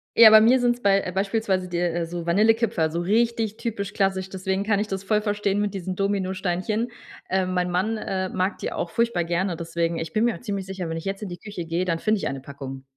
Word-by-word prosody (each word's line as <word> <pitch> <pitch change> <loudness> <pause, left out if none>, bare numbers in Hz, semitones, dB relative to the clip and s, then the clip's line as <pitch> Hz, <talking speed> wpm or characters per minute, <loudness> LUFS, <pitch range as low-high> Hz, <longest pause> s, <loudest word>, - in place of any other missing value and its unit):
Ja, 225 -1 +10
bei 215 0 +9
mir 250 +3 +5
sind's 245 0 +1
bei 195 -2 +3
beispielsweise 195 -1 0
di 175 -1 -1
so 170 0 -6
Vanillekipferl, 210 -3 +2
so 170 - -2
richtig 220 +3 +1
typisch 205 -4 -4
klassisch, 190 -1 0
deswegen 190 +1 -2
kann 205 -1 +1
ich 210 - -1
das 195 -1 -4
voll 210 0 +2
verstehen 205 -1 0
mit 205 -1 -1
diesen 185 -1 -4
Dominosteinchen. 195 +3 -1 0.4
Äh, 190 0 +1
mein 180 -1 -1
Mann, 215 +5 0
äh, 190 -2 -2
mag 185 +2 -1
die - - -3
auch 170 - -3
furchtbar 235 -7 +1
gerne, 175 +1 -1
deswegen 165 0 -2
ich 165 - -4
bin 220 +2 +2
mir 235 - +1
auch - - -12
ziemlich 200 -4 -3
sicher, 190 -3 -5
wenn 165 - -3
ich 165 - -7
jetzt 195 +2 -3
in 195 - -5
die 175 - -6
Küche 200 -4 -7
geh, 170 +3 -1
dann 165 -2 0
finde 215 +2 +1
ich - - -2
eine 135 -1 -4
Packung. 135 -1 -8
190 Hz, 230 wpm, -24 LUFS, 175-215 Hz, 0.4 s, Ja